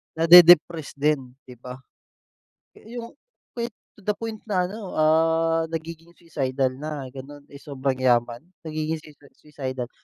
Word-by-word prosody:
nade-depressed 165 -2 +6
din, 140 -4 -1
di 125 - -13
ba? 125 0 -9 1.0
Yung 235 +1 -10 0.4
we 235 0 -2 0.3
to 205 - -17
the 210 - +1
point 225 -2 -6
na 185 -3 +1
ano, 200 0 -8
ah, 165 +1 +2
nagiging 165 +1 -7
suicidal 135 -5 -2
na 150 -1 -6
gano'n. 140 +2 -11
Eh, 140 - -12
sobrang 135 -2 -3
yaman, 120 -2 +1 0.2
nagiging 155 +1 -3
sui 155 - -15 0.2
suicidal. 130 -4 -7
155 Hz, 130 wpm, -24 LUFS, 135-170 Hz, 1.0 s, nade-depressed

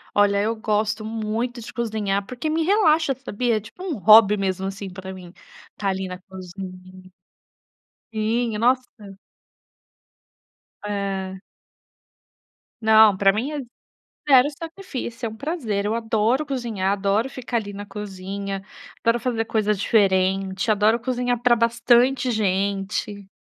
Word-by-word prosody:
Olha, 200 0 +4
eu 225 +2 0
gosto 215 0 -1
muito 225 +2 -3
de - - -9
cozinhar 215 -4 -1
porque 250 +8 -4
me 320 +1 +1
relaxa, 320 -7 +3
sabia. 240 -2 -1
É - - -1
tipo, 225 - -12
um 335 - -3
hobby 210 0 +7
mesmo, 190 -1 -2
assim, 195 0 -5
pra 190 +1 -8
mim 180 -2 -11 0.4
tá 200 -1 -1
ali 190 0 -2
na 180 0 -6
cozinha. 185 0 -10 1.0
Sim, 225 +1 0
nossa. 250 +3 +2 1.9
Ah. 195 -2 -3 1.4
Não, 220 -2 +6
pra 195 0 +4
mim 250 +8 -2
é 300 - -3 0.7
0 265 0 +7
sacrifício. 315 -9 -6
É - - -1
um 220 - -10
prazer. 230 - -2
Eu 215 - 0
adoro 230 +4 +1
cozinhar, 235 -9 -2
adoro 205 +5 0
ficar 250 -2 -3
ali 205 -3 -4
na 205 +1 -7
cozinha. 195 -1 -6 0.4
Adoro 230 +1 +3
fazer 230 -2 -1
coisa 215 -1 +1
diferente. 195 -1 +1
Adoro 215 +2 +3
cozinhar 245 0 -1
pra 245 -1 +5
bastante 240 +3 +3
gente. 200 -1 -1
215 Hz, 130 wpm, -23 LUFS, 195-240 Hz, 1.9 s, hobby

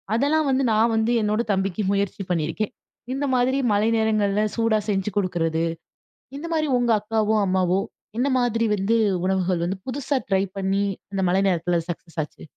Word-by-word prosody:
அதெல்லாம் 290 +4 +2
வந்து 265 0 +2
நான் 225 +1 +3
வந்து 220 +2 +1
என்னோட 210 +2 +1
தம்பிக்கு 195 +1 -1
முயற்சி 200 0 -1
பண்ணியிருக்கேன். 175 +6 -1 0.4
இந்த 280 +2 -1
மாதிரி 255 +2 +2 0.2
மழை 210 +2 +2
நேரங்கள்ல 215 -2 +1
சூடா 225 -2 +2
செஞ்சு 195 0 0
குடுக்குறது, 165 -4 0 0.8
இந்தமாரி 320 -1 -1
உங்க 240 -1 +1
அக்காவோ! 220 0 0
அம்மாவோ! 185 0 +2 0.4
என்ன 270 +3 +2
மாதிரி 230 -2 +1
வந்து 195 +4 +1 0.3
உணவுகள் 185 -2 0
வந்து 185 +2 -2
புதுசா 280 +2 -1
ட்ரை 190 0 +3 0.2
பண்ணி 195 +1 0 0.3
அந்த 195 - -1
மழை 190 +2 +2
நேரத்தில 175 -1 +1
சக்சஸ் 165 -1 -8
ஆச்சு. 150 - -10
210 Hz, 155 wpm, -23 LUFS, 190-230 Hz, 0.8 s, நான்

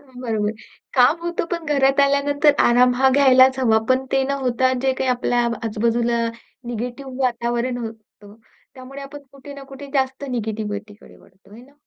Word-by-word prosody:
बरोबर. 245 -6 -3 0.4
काम 270 +6 +4
होतं 345 0 -3
पण 335 -2 -3
घरात 275 0 +3
आल्यानंतर 285 +1 +3
आराम 245 +1 +4
हा 265 +2 +3
घ्यायलाच 260 -1 +5
हवा 225 -4 +3
पण 260 +1 +2
ते 270 - +2
न 275 - -3
होता 255 0 +1
जे 265 -1 +2
काही 260 0 -2
आपल्या 245 0 0 0.2
आजू-बाजूला 235 +2 0 0.5
निगेटिव्ह 245 +3 -6
वातावरण 240 0 -1
होतं, 220 -2 -10 0.4
त्यामुळे 270 +1 -10
आपण 280 +1 -9
कुठे 280 +1 -12
ना 280 - -10
कुठे 280 +1 -9
जास्त 265 +1 -1
निगेटिव्हिटीकडे 215 -3 -6
वळतो. 190 +1 -24
आहे 235 - -13
ना. 275 +3 -20
255 Hz, 155 wpm, -21 LUFS, 235-275 Hz, 0.5 s, घ्यायलाच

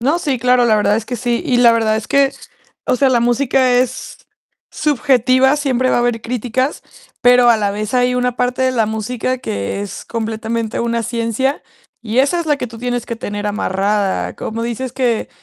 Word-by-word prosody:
No, 285 +8 +1
sí, 280 -7 -1
claro, 250 +1 +3
la 220 -2 +3
verdad 210 0 +2
es 225 - -3
que 245 - -4
sí. 240 0 -1
Y 260 -6 +1
la 240 -1 +6
verdad 220 -1 +1
es 220 - -5
que, 275 -1 +3 0.5
o - - +1
sea, 270 +1 +3
la 245 -2 +3
música 250 +1 +2
es 250 0 -1 0.5
subjetiva, 265 -2 +2
siempre 260 -3 0
va - - +2
a - - +3
haber 240 -1 0
críticas, 250 +4 -2 0.4
pero 245 0 +5
a 235 - +6
la 205 -2 0
vez, 210 +3 -4
hay 250 0 +2
una 250 -1 -1
parte 250 +1 -1
de 260 0 +2
la 225 -3 +1
música 225 +4 -3
que 100 - -4
es 205 -1 -7
completamente 225 0 -3
una 235 0 -1
ciencia, 235 +4 -1 0.4
y 230 +1 -2
esa 285 +6 +2
es 335 - -5
la 295 -1 +2
que 265 - -4
tú 230 -1 -11
tienes 245 0 -3
que 235 - -4
tener 205 -2 -5
amarrada. 200 -1 -1
Como 225 +1 -5
dices 240 +2 -4
que, 245 -4 -1
245 Hz, 200 wpm, -17 LUFS, 225-255 Hz, 0.5 s, la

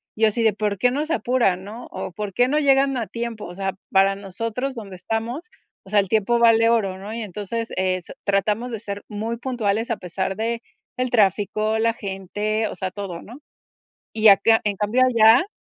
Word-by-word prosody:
y 225 - -2
yo - - +7
así 230 +2 0
de: 220 -2 +4
"¿Por 205 0 -2
qué 245 +5 +2
no 290 +4 -1
se 325 - 0
apuran?", 235 - +1
¿no?, 220 +5 -9
o, - - -5
"¿Por 205 +2 -5
qué 245 +4 +3
no 295 +3 +1
llegan 275 -2 +3
a 230 -3 -2
tiempo? 235 -2 -5
O 175 - -9
sea, 195 0 -2 0.2
para 195 0 +4
nosotros 230 +7 -4
donde 205 -5 -8
estamos, 225 - -4 0.4
o - - -14
sea, 210 +1 +4
el 195 - -5
tiempo 220 +3 +2
vale 230 -1 +5
oro, 200 -5 +1
¿no? 205 +3 -7
Y 230 - -4
entonces, 210 +3 -5
eh, 185 0 0
so - - -11
tratamos 210 +4 0
de 225 - -4
ser 200 -2 -6
muy 220 +3 -3
puntuales 230 -3 -1
a 230 - -1
pesar 190 +2 -3
de 230 +2 -2 0.4
el 255 0 0
tráfico, 215 0 +1
la 230 +1 +2
gente, 210 +1 -3
o - - -6
sea, 185 -1 -4
todo, 190 -4 -6
¿no? 240 +6 -12 0.7
Y 220 -1 +6
acá 215 +3 +5
en 205 -2 -1
cambio 210 +5 +1
allá 235 - +5
215 Hz, 210 wpm, -22 LUFS, 195-235 Hz, 0.7 s, yo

